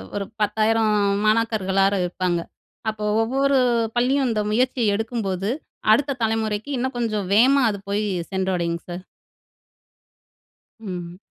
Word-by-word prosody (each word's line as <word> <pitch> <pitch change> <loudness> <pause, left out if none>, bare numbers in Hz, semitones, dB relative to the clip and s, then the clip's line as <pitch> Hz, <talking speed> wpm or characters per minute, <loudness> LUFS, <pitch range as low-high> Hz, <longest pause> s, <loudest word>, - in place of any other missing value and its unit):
ஒரு 200 -1 -2 0.2
10,000 215 +1 +2 0.3
மாணாக்கர்களாவது 200 -3 +2
இருப்பாங்க. 180 -1 -1 0.5
அப்போ 215 -1 -4 0.2
ஒவ்வொரு 270 +4 +2 0.4
பள்ளியும் 260 +3 +2
இந்த 220 -2 0
முயற்சிய 240 -2 +1
எடுக்கும்போது, 210 -3 -2 0.4
அடுத்த 275 +4 +2
தலைமுறைக்கு 220 +1 -1
இன்னும் 260 +1 -2
கொஞ்சம் 215 -5 -1
வேகமா 265 +6 +5
அது 200 -2 -4
போயி 210 +1 0 0.2
சென்றடையுங்க 180 -3 -1
சார். 175 +1 -6 1.8
ம். 180 -4 -7
215 Hz, 105 wpm, -22 LUFS, 195-235 Hz, 1.8 s, வேகமா